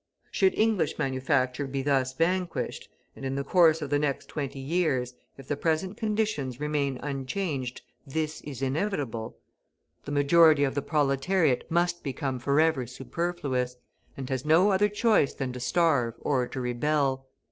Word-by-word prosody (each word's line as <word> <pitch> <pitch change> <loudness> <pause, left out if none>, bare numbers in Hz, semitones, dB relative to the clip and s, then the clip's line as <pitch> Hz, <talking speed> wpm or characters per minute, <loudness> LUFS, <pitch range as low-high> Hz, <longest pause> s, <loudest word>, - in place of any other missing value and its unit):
Should 380 -1 +2
English 215 -7 +1
manufacture 130 0 0
be 135 0 -3
thus 135 -2 +1
vanquished 180 +2 -1 0.3
and - - -11
in 135 0 -2
the 140 - -1
course 160 0 +4
of 145 - -6
the 145 - +3
next 145 -2 -1
twenty 140 -2 -4
years, 135 -4 0 0.2
if 135 -1 -12
the 145 - -1
present 165 +6 -1
conditions 210 - -1
remain 145 -3 -1
unchanged, 135 -1 -3 0.2
this 155 +2 -3
is 135 -3 -7
inevitable 135 - -2 0.7
the 145 - -5
majority 145 +1 +5
of 135 - +1
the 140 - -1
proletariat 145 +1 +1
must 175 +1 +1
become 135 -2 -3
forever 140 0 +2
superfluous, 135 -2 -3 0.4
and 135 -2 -5
has 130 -1 -1
no 170 +7 +4
other 200 +2 +3
choice 210 - +2
than 130 -2 -3
to 125 - -6
starve 125 -5 +1
or 130 -4 0
to - - -6
rebel. 135 +2 0
145 Hz, 150 wpm, -27 LUFS, 130-170 Hz, 0.7 s, majority